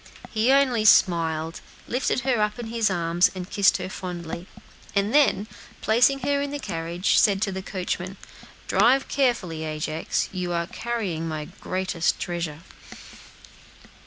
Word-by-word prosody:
He 225 +3 +2
only 265 -5 +3
smiled, 165 -5 +3 0.3
lifted 250 +1 0
her 250 -4 +1
up 210 +1 0
in 240 - -5
his 230 -2 +1
arms, 170 -1 +2
and 180 -1 -5
kissed 200 -1 +3
her - - -5
fondly; 175 -2 -6 0.5
then, 210 +1 +3 0.4
placing 245 +6 +3
her 280 +2 +1
in 285 - -2
the 290 - -4
carriage, 170 -6 0
said 200 -2 +4
to 195 - -1
the 190 0 -4
coachman, 185 0 -4 0.5
"Drive 240 +8 +3
carefully, 210 - 0
Ajax; 155 0 -2
you 180 -2 -3
are 170 0 0
carrying 195 -7 -3
my 155 -1 -4
greatest 185 +1 -2
treasure." 170 -3 -4
190 Hz, 135 wpm, -25 LUFS, 170-235 Hz, 0.5 s, said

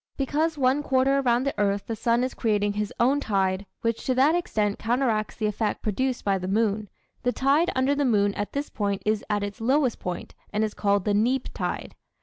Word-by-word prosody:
Because 305 +4 0
one 265 +1 +2
quarter 270 0 +2
around 245 -2 +2
the 275 - 0
earth 200 -1 +1
the 225 - -3
sun 235 +2 +1
is 255 - -2
creating 205 -3 0
his 210 0 -2
own 265 +4 +3
tide, 195 -5 0
which 230 -1 -1
to 255 - +2
that 275 +5 +4
extent 215 -12 0
counteracts 230 -2 0
the 220 - -2
effect 210 0 -1
produced 250 +4 -1
by 195 -1 +2
the 185 - -4
moon, 210 0 0 0.3
the 245 - +1
tide 280 +7 +2
under 260 +2 +2
the 285 0 0
moon 205 -5 +2
at 205 - -4
this 285 +1 -3
point 200 -2 -2
is 215 0 +1
at 205 -1 0
its 205 +1 -6
lowest 260 +1 +2
point 180 -1 -5 0.2
and 210 +1 0
is 215 -1 -1
called 200 -2 +1
the 205 - +2
"neap" 240 +5 +1
tide. - - -4
225 Hz, 210 wpm, -25 LUFS, 205-265 Hz, 0.3 s, that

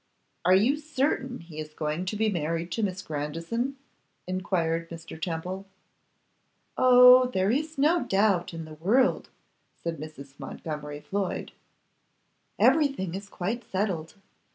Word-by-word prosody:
'Are 185 +1 +6
you 235 +10 +3
certain 275 - -1
he 165 -2 -10
is 155 0 -7
going 155 +3 -2
to 190 - -3
be 220 +1 +1
married 170 -2 -2
to 225 - -1
Miss 190 -1 -2
Grandison?' 165 - -3 0.5
enquired 170 -3 -1
Mr. 165 -1 -9
Temple. 180 +4 -4 1.1
'Oh! 250 0 +8
there 195 -4 +1
is 310 +4 -1
no 315 +5 +3
doubt 195 -3 +2
in 165 -1 -6
the 155 - -10
world,' 210 - +2 0.5
said 170 -1 -4
Mrs. 140 -2 -10
Montgomery 150 +1 -6
Floyd. 195 +1 -3 1.1
'Everything 275 - +3
is 200 +2 -6
quite 220 +8 -3
settled. 185 -4 -2
185 Hz, 130 wpm, -27 LUFS, 165-240 Hz, 1.1 s, Oh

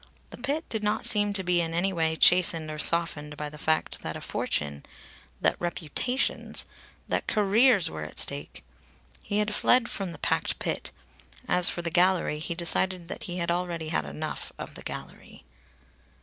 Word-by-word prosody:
The - - -10
pit 285 +6 -3
did 220 - -3
not 210 +1 +1
seem 205 -1 +5
to 195 -1 +2
be 180 -1 +2
in 165 0 -3
any 190 +3 0
way 160 -2 0
chastened 170 -2 +4
or 155 - -6
softened 155 -3 +2
by 150 0 -4
the 150 0 -12
fact 155 +1 0
that - - -5
a - - -6
fortune, 70 -1 -2 0.6
that - - +2
reputations, 175 - -2 0.4
that - - -1
careers 210 0 +3
were 80 0 -6
at 75 - -8
stake. 70 +2 +1 0.6
He 205 - -3
had 210 0 0
fled 245 +3 +3
from 195 -3 -4
the 165 - -9
packed - - -1
pit. - - -3 0.6
(As 180 -1 +5
for 175 - -4
the 170 - -3
gallery, 180 -3 +2
he 165 +2 -4
decided 175 +1 +1
that - - -6
he 175 0 -5
had 170 -1 -1
already 170 -2 -3
had 75 - -1
enough 75 +1 -6
of - - -8
the - - -10
gallery.) - - -9
175 Hz, 180 wpm, -27 LUFS, 160-200 Hz, 0.6 s, seem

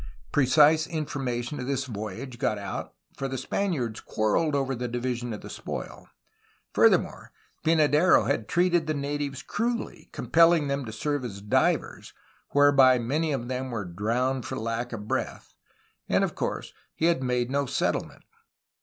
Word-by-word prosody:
Precise 150 +3 +5
information 135 -4 -3
of 125 - -4
this 135 -1 -1
voyage 115 +2 -6
got 120 -6 0
out, 100 - -6 0.2
for 135 - -3
the 130 0 -4
Spaniards 130 - -2
quarreled 145 +8 0
over 135 -1 0
the 125 0 -3
division 120 0 -3
of 105 - -6
the - - -9
spoil. - - -7 0.7
Further - - +6
more, - - -8 0.3
Pynadero 155 +1 +4
had 110 - -1
treated 175 -2 +2
the 155 - 0
natives 145 0 -3
cruelly, 235 +2 -3
compelling 165 -2 +4
them 140 -1 -2
to 110 - -6
serve 145 +5 -2
as 100 -5 -6
divers, 105 +1 0 0.3
whereby 140 -3 +6
many 145 +7 -1
of 125 -4 -2
them 130 +1 -3
were 115 -5 -3
^ 85 -1 -10
'drowned 125 +6 0
for - - -5
lack 115 +2 -3
of 105 -3 -6
breath," - - -3 0.6
and - - +3
of - - -1
course - - -4 0.2
he 160 - 0
had 170 -5 +3
made 125 -1 0
no 140 0 0
settlement. - - -2
130 Hz, 160 wpm, -27 LUFS, 120-150 Hz, 0.7 s, Further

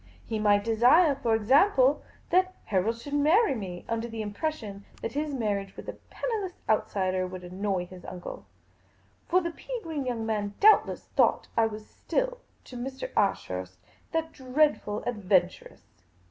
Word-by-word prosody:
He 220 - -3
might 205 -1 +3
desire, 245 - +5
for 240 -5 +1
example, 265 - +4 0.3
that 370 +1 +3
Harold 215 +4 0
should 285 +5 -8
marry 315 +8 +4
me, 185 -7 -6
under 230 0 -2
the 225 -2 -5
impression 205 -2 -4 0.2
that - - -4
his 295 +3 -2
marriage 205 -6 -2
with - - -9
a - - -4
penniless 420 -7 -4
outsider 185 -3 +1
would 180 0 -8
annoy 185 0 -2
his 180 0 -12
uncle; 180 - -8 0.8
for 365 +2 +3
the 340 -1 -3
pea - - -6
green 300 -5 -4
young 230 -3 -2
man 205 -2 -2
doubtless 430 +1 +5
thought - - +3
that - - +4
I 225 - +4
was 215 0 -8
still - - -2 0.2
to 255 - -12
Mr. 265 +2 -5
Ashurst 95 - -1
just - - -37 0.3
that 325 0 -1
dreadful 260 -5 0
adventuress. 190 -6 0
230 Hz, 160 wpm, -28 LUFS, 200-300 Hz, 0.8 s, desire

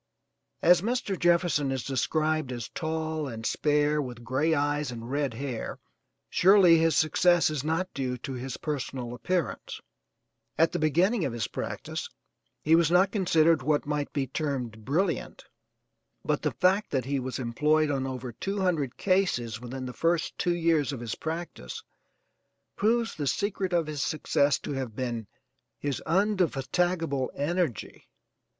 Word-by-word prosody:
As 175 0 +6
Mr. 230 -1 -1
Jefferson 170 -5 +2
is 130 -3 -2
described 155 +2 0
as 120 -3 -5
tall 160 -1 -3
and 115 -3 -6
spare 150 +2 +2
with 120 -3 -7
gray 140 +7 +1
eyes 145 -1 0
and 120 0 -7
red 140 -4 -1
hair, 130 -2 -4 0.5
surely 185 -3 +6
his 165 -2 +3
success 165 +2 +4
is 145 -3 -2
not 165 +4 -1
due 130 -2 -2
to 135 +2 -6
his 130 0 -5
personal 130 -5 -4
appearance. 150 +4 -2 0.8
At 165 +1 +4
the - - -2
beginning 175 +7 +2
of 135 - -1
his 115 -2 -2
practice - - -5 0.5
he 155 - +3
was 165 -1 +4
not 185 +3 +4
considered 165 -5 +3
what 150 -1 +1
might 145 0 -2
be 140 -2 -1
termed 125 -6 -4
brilliant, 170 - -1 0.8
but - - 0
the - - +1
fact 190 +3 +2
that 130 -4 -1
he 140 0 -1
was 130 0 -4
employed 150 +5 +1
on 135 -1 -1
over 130 -1 -5
two 195 - -4
hundred 160 -9 0
cases 125 - +1
within 130 +1 -6
the 125 - -6
first 165 +2 0
two 175 -1 +1
years 165 -4 +2
of 135 - -5
his 115 -2 -4
practice 160 - -6 0.9
proves 225 +2 +1
the 145 -2 -3
secret 195 - -1
of 170 -2 +2
his 150 -2 -4
success 145 -1 +1
to - - -5
have 130 -5 -4
been 120 -4 -3 0.5
his 140 +2 -3
undefatigable 175 -5 +1
energy. 160 -2 -2
150 Hz, 150 wpm, -28 LUFS, 130-170 Hz, 0.9 s, As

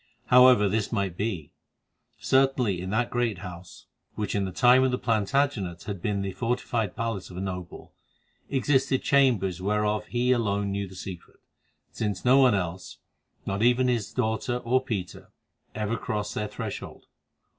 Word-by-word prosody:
However 125 -4 +7
this 105 +1 -1
might 100 -6 -1
be, 95 -7 -3 0.7
certainly 130 -8 +2
in 95 - -5
that 115 +4 0
great 120 -5 0
house, 90 -1 -10 0.3
which 105 - -3
in 100 -1 0
the 95 - -4
time 125 +7 +5
of 130 - +3
the 125 - 0
Plantagenets 110 - 0
had 100 -4 -6
been 100 0 -1
the 100 - -3
fortified 115 0 -2
palace 115 -5 -3
of 90 - -10
a - - -3
noble, 90 -2 -6 0.6
existed 135 0 +1
chambers 115 -11 +2
whereof 105 +1 0
he 125 +1 +1
alone 100 -4 0
knew 100 0 -2
the 95 - -13
secret, 90 -1 -9 0.5
since 105 -4 -3
no 130 +2 +6
one 130 -5 +5
else, 90 -1 -4 0.5
not 100 +1 -2
even 125 +2 +3
his 115 -5 -1
daughter 120 0 -1
or 125 +2 +1
Peter, 100 -9 -5 0.5
ever 110 +1 -1
crossed 105 -1 -3
their 105 - -2
threshold. - - -7
105 Hz, 155 wpm, -26 LUFS, 95-125 Hz, 0.7 s, However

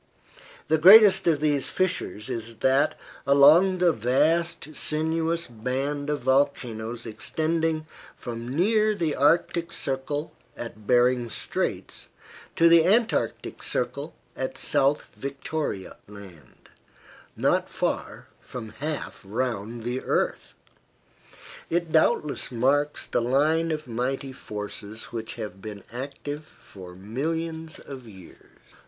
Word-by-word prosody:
The 160 0 +2
greatest 195 +2 +8
of 155 -3 +3
these 145 -3 +1
fissures 180 - -2
is 115 -2 -5
that 135 +3 +3 0.3
along 155 +7 +6
the 175 -2 +3
vast 150 +7 +1
sinuous 160 +3 -1
band 135 +5 -3
of 150 -2 -1
volcanoes 120 -4 0
extending 155 +7 -1 0.3
from 115 -1 -6
near 215 +5 +3
the 165 -6 -1
Arctic 170 +3 +2
circle 140 +2 -3 0.2
at 110 -3 -8
Behring's 125 -1 +3
Straits - - -3 0.5
to 165 - +5
the 165 -1 +7
Antarctic 220 +6 +1
circle - - -3 0.2
at - - -4
South 145 0 +2
Victoria 140 - -4
Land, 95 -9 -14 0.7
not - - +1
far - - -3
from 120 -4 -8
half 145 +7 -5
round 115 +1 -3
the 125 +2 -2
earth. - - -1 1.1
It 170 -1 -1
doubtless 155 -3 +1
marks 140 +5 +1
the - - 0
line 150 +7 +2
of 155 -1 -3
mighty 130 +3 -3
forces 105 -1 -7
which 115 +1 -5
have 105 -5 -7
been 105 -2 -8
active 140 +3 -6 0.2
for 90 -2 -12
millions 160 - -4
of 130 -4 -10
years. 95 -4 -15
140 Hz, 110 wpm, -26 LUFS, 115-160 Hz, 1.1 s, greatest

